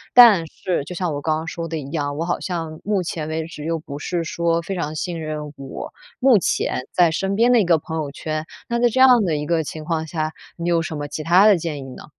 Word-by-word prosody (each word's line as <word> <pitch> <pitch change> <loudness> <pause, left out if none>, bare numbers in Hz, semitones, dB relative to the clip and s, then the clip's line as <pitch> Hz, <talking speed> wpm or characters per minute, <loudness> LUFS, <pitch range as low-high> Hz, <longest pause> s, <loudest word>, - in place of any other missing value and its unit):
但 215 -9 +8
是， 175 -4 -2
就 180 - -7
像 175 -3 -1
我 145 - -4
刚 155 0 +1
刚 160 - -5
说 165 0 -5
的 165 0 -3
一 140 -2 -7
样， 145 -3 -2
我 165 - -1
好 175 - -1
像 165 -3 -4
目 200 -2 0
前 160 -2 -4
为 160 0 -2
止， 155 -3 -9
又 165 +1 -1
不 145 -2 -8
是 170 +2 -2
说 170 0 0
非 195 - -4
常 155 -3 -3
信 170 0 -3
任 150 -1 -5
我 135 -1 -8 0.3
目 250 -5 +5
前 130 - -1
在 175 -3 +4
身 195 +4 -1
边 235 +3 +4
的 245 - +6
一 - - +1
个 170 -1 +4
朋 160 +1 -6
友 155 -3 -2
圈， 155 +2 -4 0.2
那 235 0 -1
在 240 0 +4
这 260 +3 -1
样 250 -3 +7
的 165 -4 0
一 150 0 -2
个 165 -1 +1
情 155 +1 -7
况 160 -1 -1
下， 155 -1 -2 0.2
你 170 0 -4
有 170 -1 +3
什 165 -2 -4
么 145 0 -4
其 150 +2 -5
它 175 +6 +5
的 210 - +7
建 160 -2 -3
议 140 - -7
呢？ - - -11
165 Hz, 285 characters per minute, -22 LUFS, 155-180 Hz, 0.3 s, 但